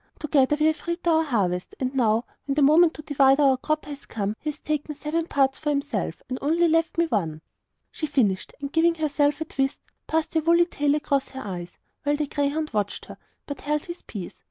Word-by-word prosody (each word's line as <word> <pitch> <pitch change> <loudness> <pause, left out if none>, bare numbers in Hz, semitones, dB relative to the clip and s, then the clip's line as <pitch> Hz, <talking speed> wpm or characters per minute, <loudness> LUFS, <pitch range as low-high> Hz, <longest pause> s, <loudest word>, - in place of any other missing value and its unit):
Together 295 -1 +2
we 305 - +3
have 315 +2 0
reaped 340 0 -3
our 320 -1 +4
harvest; 195 - -1
and 260 0 -1
now, 230 -3 +2 0.2
when 275 - 0
the 295 - +3
moment 320 +4 +6
to 305 - -9
divide 275 -2 +4
our 275 -2 +5
crop 305 +4 -2
has 285 -1 -9
come, 210 -1 -2
he 305 - -3
has 300 - -5
taken 300 0 -3
seven 315 +3 -2
parts 270 -3 +1
for 305 - -2
himself, 280 - -2
and 255 0 -4
only 330 +4 +3
left 330 0 +1
one 335 0 +3
for 210 - +1
me.' 155 0 -8 0.5
She 310 - -3
finished, 205 -10 +1
and 280 -1 -5
giving 330 +1 +4
herself 295 -2 +1
a - - -1
twist, 270 -2 -1 0.3
passed 320 0 0
her 320 - +2
woolly 340 +2 +4
tail 295 -4 +1
across 285 -2 0
her 265 - -7
eyes; 175 -3 -6 0.2
while 290 0 +1
the 300 0 -1
greyhound 290 +2 -1
watched 205 -1 -2
her, - - -11 0.3
but 285 - -6
held 300 +1 -1
his 345 0 -7
peace. 190 -5 -7
290 Hz, 220 wpm, -25 LUFS, 265-315 Hz, 0.5 s, moment